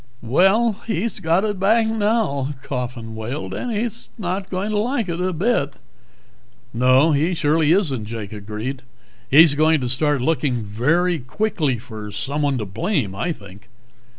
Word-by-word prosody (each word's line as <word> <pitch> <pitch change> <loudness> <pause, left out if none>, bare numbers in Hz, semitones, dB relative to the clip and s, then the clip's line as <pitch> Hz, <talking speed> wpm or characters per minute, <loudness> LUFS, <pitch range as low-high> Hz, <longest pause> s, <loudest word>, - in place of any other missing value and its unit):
"Well, 195 - +3
he's 215 0 -1
got 170 +2 +2
it 205 -3 -2
back 220 +4 +4
again 220 0 -2
now," 180 - 0
Coffin 125 -3 -5
wailed, 120 +7 -5
"and 245 - -3
he's 230 +2 -3
not 190 -1 -3
going 195 +3 -2
to 210 - +1
like 235 -1 0
it 170 0 -3
a 185 +1 0
bit." 170 - 0 1.0
"No, 130 +6 +4
he 155 +5 +1
surely 155 0 +2
isn't," 145 - +1
Jake 110 -2 -6
agreed. 110 +6 -5 0.5
"He's 155 +2 +7
going 155 +2 +3
to 125 - -2
start 145 +3 +1
looking 140 -6 0
very 155 - +1
quickly 150 - -1
for 110 -3 -8
someone 140 +6 -1
to 110 - -3
blame, 115 - -1
I 100 - -2
think." 100 - -11
150 Hz, 155 wpm, -21 LUFS, 125-190 Hz, 1.0 s, He's